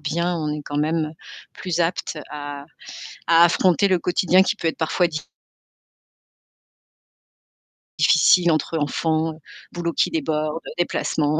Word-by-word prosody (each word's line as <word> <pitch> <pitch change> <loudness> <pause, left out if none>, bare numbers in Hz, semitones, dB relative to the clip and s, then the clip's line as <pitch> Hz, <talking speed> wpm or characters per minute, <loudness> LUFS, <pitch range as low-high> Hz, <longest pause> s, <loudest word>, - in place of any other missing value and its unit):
bien, 170 +4 -1
on 155 -2 -3
est 150 0 -4
quand 145 - -4
même 155 0 -1 0.4
plus 175 -3 -4
apte 170 -1 -2
à 145 -1 -7 0.6
à 170 0 +6
affronter 180 +2 +3
le 185 -2 +2
quotidien 180 +2 +3
qui 200 - -1
peut 170 - -1
être 160 - -4
parfois 170 +2 +1
di 155 -2 -5 2.8
difficile 170 +3 +5
entre 160 +1 -1
enfants, 160 +2 -1 0.4
boulots 170 -1 -3
qui - - +1
déborde, 155 0 -2 0.2
déplacements. 155 -3 0
160 Hz, 125 wpm, -22 LUFS, 155-175 Hz, 2.8 s, à